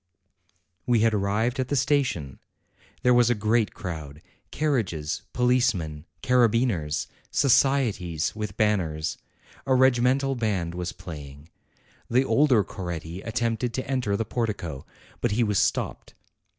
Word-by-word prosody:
We 120 -3 +3
had 115 0 +3
arrived 105 +6 0
at 130 - 0
the 145 - -1
station; 130 - 0 0.6
there 125 - +5
was 120 -1 +5
a 120 - +3
great 110 +1 +1
crowd, 80 -4 -7 0.3
carriages, 110 - -1
policemen, 120 -12 +1 0.2
carabineers, 115 - +2 0.2
societies 115 - +2
with 105 -2 -5
banners. 85 -8 0 0.5
A 130 - +4
regimental 130 +1 +3
band 100 -9 -1
was 90 0 -4
playing. 75 -2 -10 0.6
The 125 +2 +4
KING 135 - -3
UMBERTO 150 +2 +5
207 130 -5 +4
elder 105 - +4
Coretti 85 -1 -6
attempted 115 +1 -1
to 130 - -3
enter 125 -7 0
the 115 - -1
portico, 100 - -3 0.3
but 120 -3 +1
he 120 +3 +2
was 105 -4 +1
stopped. - - -1
110 Hz, 135 wpm, -26 LUFS, 85-125 Hz, 0.6 s, there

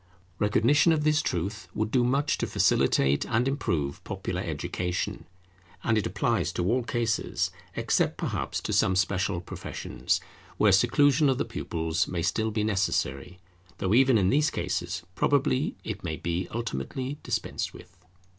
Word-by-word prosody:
Recognition 120 +10 +4
of 150 -2 0
this 155 0 +3
truth 95 - -3
would 110 0 -1
do 125 0 +3
much 140 +4 +1
to - - -1
facilitate 70 +1 +3
and 120 +2 +1
improve 85 - -1
popular - - -4
education; 90 0 -3 0.6
and 110 - +2
it 110 - +1
applies - - 0
to 90 - -1
all 120 +7 +2
cases, 115 -2 -1 0.2
except - - +1
perhaps - - -2
to - - -3
some 95 - +3
special 95 -1 +1
professions, 85 +1 -3 0.4
where 105 - +5
seclusion 135 +8 +4
of 130 - +2
the - - 0
pupils 80 +4 -2
may 85 -2 -2
still 110 +5 0
be 110 -1 -1
necessary, 90 -6 -1 0.4
though 95 +2 0
even 130 0 +5
in 95 -2 +3
these 150 +2 +3
cases 85 -2 -3
probably 140 - +1
it 105 -1 -5
may 80 -3 -2
be 85 +3 -2
ultimately 120 - -4
dispensed - - -2
with. 95 - -14
105 Hz, 150 wpm, -27 LUFS, 90-130 Hz, 0.6 s, where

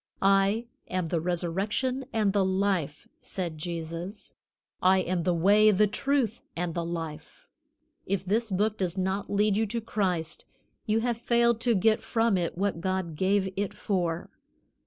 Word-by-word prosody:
"I 195 +3 +3 0.2
am 180 -3 -2
the 165 -1 0
resurrection 195 +10 -1
and 215 -4 +1
the 200 -1 +3
life," 190 -6 0
said 170 -5 -4
Jesus; 170 +4 -5 0.5
"I 190 +1 +5
am 185 -1 0
the 175 +1 +1
way, 205 +5 +5
the 210 +1 +4
truth 235 +2 0
and 175 -1 -2
the 170 - -2
life." 165 -2 -6 0.6
If 195 -1 -1
this 220 +4 +1
Book 210 +3 0
does 185 -1 -1
not 190 +2 -1
lead 205 0 +2
you 220 0 +1
to 230 +3 -2
Christ, 185 -7 -2 0.4
you 220 +1 +2
have 240 -1 0
failed 235 -1 +2
to 235 0 +2
get 215 +3 +3
from 225 -2 +1
it 175 -2 -1
what 195 -3 -1
God 185 -3 -2
gave 190 +2 +1
it 200 0 -2
for. 175 -4 -2
195 Hz, 155 wpm, -28 LUFS, 175-215 Hz, 0.6 s, I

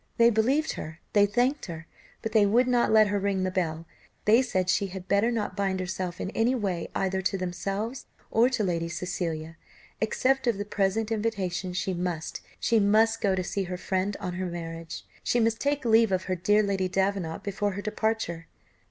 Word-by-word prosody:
They 235 0 +6
believed 265 +8 +2
her, 160 +1 -7
they 205 -1 +5
thanked 245 +7 +1
her, 165 -2 -7 0.4
but 225 - -2
they 215 -1 +5
would 240 +5 +3
not 245 -2 +3
let 215 -1 +6
her 205 0 +1
ring 195 -1 0
the 185 - 0
bell; 165 -3 -2 0.4
they 225 +4 +6
said 190 -8 -1
she 195 +2 +2
had 190 -1 -8
better 200 +3 +3
not 225 -3 -2
bind 195 -2 0
herself 185 -1 -4
in 190 - -3
any 235 +4 +2
way 190 -8 -2
either 190 0 0
to 190 +1 0
themselves 195 +7 -3 0.2
or 235 +3 +4
to 245 -5 0
Lady 170 -3 -1
Cecilia. 165 -2 -4 0.4
Accept 260 +4 +1
of 230 -4 +2
the 205 - -3
present 210 +2 0
invitation 200 -5 -1
she 185 +1 -2
must 175 -2 -3 0.2
she 230 - +3
must 220 +2 +3
go 195 -2 +2
to 185 - -1
see 195 +1 -2
her 180 0 -4
friend 190 +2 -1
on 180 -3 -4
her 185 +1 -3
marriage; 165 -1 -6 0.2
she 240 - +1
must 225 -1 +2
take 285 -2 0
leave 225 -2 +5
of 185 0 +1
her 185 - -1
dear 205 +4 +3
Lady 195 -2 0
Davenant 190 -2 -1
before 205 0 -1
her 200 - -4
departure. 215 -6 -2
200 Hz, 195 wpm, -27 LUFS, 180-220 Hz, 0.4 s, They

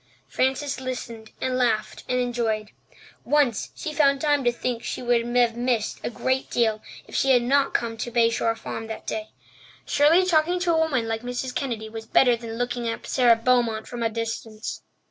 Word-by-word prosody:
Frances 265 +1 -1
listened 235 -3 -6
and 255 0 0
laughed 220 -3 0
and 250 0 +1
enjoyed. 230 -4 -1 0.5
Once 275 -5 +1
she 310 - -5
found 280 -2 +3
time 290 -2 +2
to 240 - +3
think 240 0 -3
that - - -8
she - - -3
would 240 -1 +2
have 240 -2 +3
missed 240 -3 -1
a - - -1
great 260 +2 -1
deal 220 -2 +1 0.3
if - - -15
she 270 - +2
had 245 -2 +5
not 275 +3 +2
come 230 -1 -1
to 230 - -4
Bay 230 -1 +3
Shore 230 -1 0
Farm 225 0 -6
that 220 - -7
day. 215 0 -4 0.6
Surely 325 +6 +4
talking 345 0 +2
to 350 -2 +2
a - - +2
woman 270 -8 +1
like 225 0 -2
Mrs. 245 +1 -4
Kennedy 230 -5 -3
was 220 0 -8
better 245 +1 +5
than 230 -1 -7
looking 245 0 -2
at 230 - -5
Sara 245 -3 +4
Beaumont 230 -2 +1
from 240 -1 -6
a 230 - +1
distance. 225 -1 -5
240 Hz, 195 wpm, -24 LUFS, 225-260 Hz, 0.6 s, had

